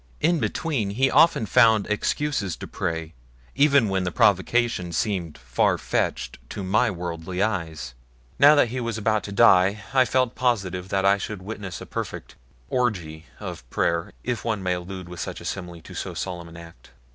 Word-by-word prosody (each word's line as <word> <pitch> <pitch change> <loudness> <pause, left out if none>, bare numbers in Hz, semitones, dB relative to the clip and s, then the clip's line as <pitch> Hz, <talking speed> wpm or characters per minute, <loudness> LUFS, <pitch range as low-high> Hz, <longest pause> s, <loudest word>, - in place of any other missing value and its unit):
In 165 +2 +2
between 120 - -1
he 130 +6 +1
often 165 -9 +5
found 110 -2 +5
excuses 105 - -1
to - - -8
pray 80 0 -4 0.4
even 140 -5 +4
when 95 -1 0
the 90 - -2
provocation 100 0 +2
seemed 90 -4 -2
far - - +1
fetched - - -2
to 100 - -5
my 110 +6 +2
worldly 90 0 -3
eyes 80 - -3 0.5
now 145 +2 +8
that 135 -5 +4
he 130 +2 -3
was 115 -2 -3
about 110 0 +1
to 100 - -6
die 100 -1 +5
I 130 -1 +5
felt 130 0 +1
positive 95 -7 -1
that 95 0 0
I 100 +1 +4
should 100 -1 -6
witness 100 -3 -6
a - - -7
perfect - - -6 0.3
orgy 85 -11 -2
of - - -8
prayer 85 +6 -1
if 120 -5 -2
one 110 -4 -2
may 90 -1 +1
allude 90 +1 -6
with 90 -1 -9
such 80 - -5
a - - -11
simile 90 -3 -5
to - - -12
so - - -5
solemn 85 -3 -5
an 85 - -12
act. 85 0 -14
100 Hz, 180 wpm, -24 LUFS, 90-115 Hz, 0.5 s, now